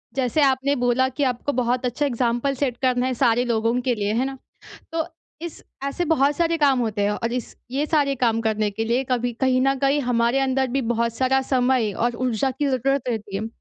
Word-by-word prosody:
जैसे 265 +2 +1
आपने 270 +1 +2
बोला 245 0 +2
कि 285 +3 -2
आपको 255 +2 -1
बहुत 250 +1 0
अच्छा 250 +4 -1
एग्ज़ाम्पल 240 +1 0
सेट 255 -3 -1
करना 255 -1 +2
है 260 - 0
सारे 240 -1 +2
लोगों 230 0 +1
के 250 0 +1
लिए, 205 -1 -1
है 245 +4 +1
ना? 270 0 -5 0.6
तो 325 -1 -1 0.4
इस 340 -2 -7 0.2
ऐसे 280 +5 -2
बहुत 290 -3 +2
सारे 335 -1 +1
काम 280 -4 +3
होते 215 -3 -1
हैं 200 - +2
और 230 +3 -2
इस 245 -2 -5
ये 280 +4 -1
सारे 290 -3 +2
काम 230 -2 +1
करने 215 -2 0
के 225 +3 -3
लिए 240 +4 0
कभी 245 -1 0
कहीं 260 -1 +3
न 270 +1 +3
कहीं 275 +2 +2
हमारे 240 0 +1
अंदर 265 0 +1
भी - - +2
बहुत 235 0 -1
सारा 260 +2 +2
समय 255 -4 +1
और 240 +4 -1
ऊर्जा 250 +2 0
की 290 +3 -2
ज़रूरत 270 0 0
रहती 210 -4 -3
है। 215 +3 -3
255 Hz, 215 wpm, -23 LUFS, 235-275 Hz, 0.6 s, काम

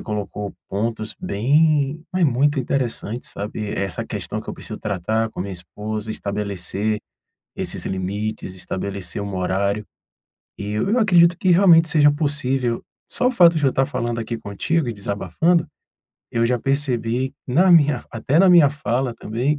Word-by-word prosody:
colocou 105 -1 -5
pontos 110 +1 -3
bem 145 +6 +1
mas 185 -1 0
muito 140 +1 +2
interessante 120 -3 -2
sabe 105 +1 -5
essa 95 -2 -3
questão - - -4
que - - -15
eu - - -3
preciso - - -8
tratar 110 +3 -1
com - - -7
a - - 0
minha 100 0 -6
esposa, 105 +4 -6
estabelecer 100 0 -2 0.6
esses - - -1
limites, 95 +1 -3
estabelecer 95 +1 -4
um 100 -1 -5
horário. 100 +3 -1 0.7
E 100 - -6
eu 110 - 0
eu 245 +3 +3
acredito 175 -5 +5
que 185 - 0
realmente 170 -3 +6
seja 145 -1 +5
possível, 135 -5 -1 0.3
só 250 - +1
o - - +2
fato 170 -7 +5
de 145 - +1
eu 130 - +2
tá 135 - +2
falando 120 -2 -3
aqui 115 +1 -4
contigo 125 +10 -1
e - - -3
desabafando, 160 - 0 0.6
eu 115 0 +1
já 125 0 +1
percebi 130 -1 0
na 180 +9 +4
minha 150 -6 +4
até 125 +7 0
na 190 +1 +6
minha 165 -6 +7
fala 130 -4 -2
também 125 +7 -1
120 Hz, 160 wpm, -21 LUFS, 105-150 Hz, 0.7 s, minha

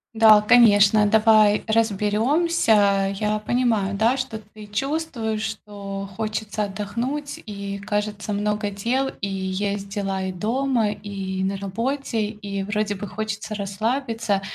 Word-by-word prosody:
Да, 220 -1 +7
конечно, 210 -2 +6
давай 215 -1 +5
разберемся. 215 - +2
Я 210 0 0
понимаю, 215 -4 0
да, 230 +5 +3
что 255 -4 -4
ты 215 0 -13
чувствуешь, 230 -1 -2
что 200 -2 -6
хочется 215 0 -3
отдохнуть, 235 +9 -4
и, 200 -1 -6
кажется, 210 +1 -3
много 210 0 -1
дел, 245 +7 -1
и 200 - -2
есть 195 +1 -3
дела 195 -1 -2
и 190 - -2
дома, 230 +4 0
и 195 -2 -5
на 195 +1 -1
работе, 230 +3 -2
и 200 -2 -5
вроде 210 +1 -1
бы 205 +2 -6
хочется 215 0 -4
расслабиться. 220 +1 -1
210 Hz, 125 wpm, -23 LUFS, 200-225 Hz, -, Да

